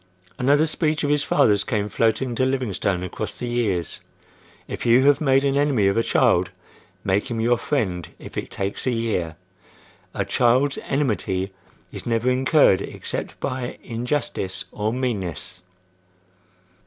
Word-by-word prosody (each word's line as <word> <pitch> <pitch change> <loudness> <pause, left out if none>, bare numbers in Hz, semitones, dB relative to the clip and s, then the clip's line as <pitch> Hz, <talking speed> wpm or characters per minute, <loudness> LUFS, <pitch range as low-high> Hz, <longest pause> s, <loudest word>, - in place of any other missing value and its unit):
Another 145 +4 +4
speech 155 -1 0
of 145 - +1
his 145 -1 +3
father's 105 -9 +3
came 105 -1 -1
floating 115 +4 0
to 125 - 0
Livingstone 110 -8 -1
across 90 - -5
the - - -4
years: 110 -8 -1 0.7
"If - - -5
you 120 +3 +5
have 145 +1 +4
made 135 -2 +3
an 140 -1 +1
enemy 140 -7 +2
of 100 0 +3
a 115 - +3
child, - - +3 0.5
make 100 +1 0
him 115 -2 -3
your 120 +1 +2
friend 95 - -1
if - - -11
it - - -4
takes 100 +5 -3
a - - +3
year! 110 -9 -1 0.8
A - - -1
child's 130 +4 +2
enmity 100 -8 -1 0.4
is - - -6
never 115 +2 +1
incurred 130 - +4
except - - -5
by 125 -1 -3
injustice 120 -5 -3
or 105 +1 -2
meanness." 100 - -3
120 Hz, 145 wpm, -23 LUFS, 100-135 Hz, 0.8 s, you